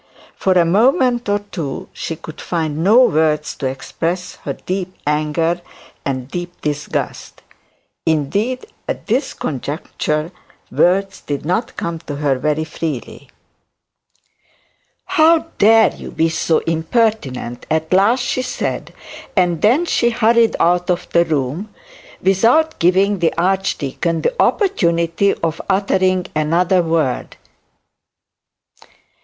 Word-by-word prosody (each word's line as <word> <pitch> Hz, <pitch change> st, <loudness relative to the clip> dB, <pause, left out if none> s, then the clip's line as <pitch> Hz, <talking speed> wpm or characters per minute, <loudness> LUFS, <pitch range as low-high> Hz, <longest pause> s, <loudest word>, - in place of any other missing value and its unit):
For 190 Hz, -, +1 dB
a 175 Hz, -2 st, +4 dB
moment 240 Hz, +5 st, +2 dB
or 205 Hz, -, +3 dB
two 175 Hz, -9 st, -6 dB
she 165 Hz, -, -4 dB
could 155 Hz, -1 st, -10 dB
find 160 Hz, -2 st, -2 dB
no 225 Hz, +7 st, +6 dB
words 155 Hz, -6 st, +1 dB
to 135 Hz, -, -2 dB
express 165 Hz, +7 st, -4 dB
her -, -, -5 dB
deep 185 Hz, 0 st, -4 dB
anger 155 Hz, +3 st, 0 dB, 0.4 s
and 130 Hz, -2 st, -3 dB
deep 175 Hz, +4 st, -6 dB
disgust; 150 Hz, -1 st, -4 dB, 0.6 s
and, 160 Hz, -, +5 dB
indeed, 210 Hz, -, -2 dB, 0.2 s
at -, -, -4 dB
this 250 Hz, +6 st, -1 dB
conjuncture, 150 Hz, +2 st, -3 dB, 0.4 s
words 195 Hz, +2 st, +1 dB
did 145 Hz, 0 st, -4 dB
not 200 Hz, +8 st, -1 dB
come 170 Hz, -1 st, -3 dB
to 150 Hz, -3 st, -7 dB
her 140 Hz, -3 st, 0 dB
very 150 Hz, +3 st, 0 dB
freely. 155 Hz, -5 st, -6 dB, 1.8 s
'How 320 Hz, +1 st, +4 dB
dare 220 Hz, 0 st, +6 dB
you -, -, -9 dB
be 165 Hz, +1 st, +1 dB
so 160 Hz, 0 st, +1 dB
impertinent?' 160 Hz, -, -1 dB
at 160 Hz, +2 st, 0 dB
last 210 Hz, +7 st, +4 dB
she 255 Hz, -, -1 dB
said; 255 Hz, -, -4 dB, 0.4 s
and 175 Hz, -3 st, +2 dB
then 255 Hz, +11 st, +4 dB
hurried 235 Hz, -4 st, +3 dB
out 175 Hz, +1 st, +2 dB
of 180 Hz, 0 st, 0 dB
the 170 Hz, 0 st, +4 dB
room, 155 Hz, +6 st, -2 dB, 0.5 s
without 230 Hz, -, +3 dB
giving 190 Hz, +3 st, +3 dB
the 170 Hz, -1 st, +1 dB
archdeacon 170 Hz, -3 st, 0 dB
the -, -, +1 dB
opportunity 170 Hz, -, +2 dB
of 165 Hz, -1 st, -1 dB
uttering 185 Hz, -2 st, +2 dB
another 175 Hz, +4 st, +2 dB
word. 160 Hz, -6 st, -1 dB
175 Hz, 120 wpm, -18 LUFS, 155-205 Hz, 1.8 s, no